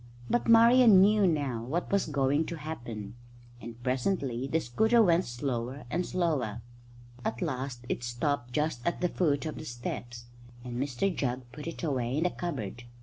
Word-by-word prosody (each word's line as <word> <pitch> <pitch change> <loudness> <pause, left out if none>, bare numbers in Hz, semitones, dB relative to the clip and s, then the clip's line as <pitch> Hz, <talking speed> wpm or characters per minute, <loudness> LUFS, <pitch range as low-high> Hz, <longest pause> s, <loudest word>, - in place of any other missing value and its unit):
But 240 - +1
Marian 230 -2 +7
knew 205 +1 +5
now 140 -8 -1
what 155 +9 -3
was 200 -3 +2
going 145 +1 +1
to 170 - -4
happen, 120 -9 -6 0.5
and 120 +1 -9
presently 130 -1 -1
the 160 +4 +1
scooter 220 - +2
went 175 -2 +3
slower 120 +1 -4
and 175 - 0
slower. 145 - -1 0.6
At 115 -1 -2
last 130 -5 -4
it - - -2
stopped 120 +1 -2
just 150 -2 -1
at 170 - -1
the 180 - +2
foot 150 -5 0
of 155 - -4
the 155 - -7
steps, 120 -1 -6 0.4
and 125 0 -4
Mr 145 +7 -1
Jugg 125 -2 -1
put 150 +1 -8
it 165 - -6
away 130 -4 -1
in 160 - +1
the 180 - +1
cupboard. 120 - -5
140 Hz, 170 wpm, -29 LUFS, 120-170 Hz, 0.6 s, Marian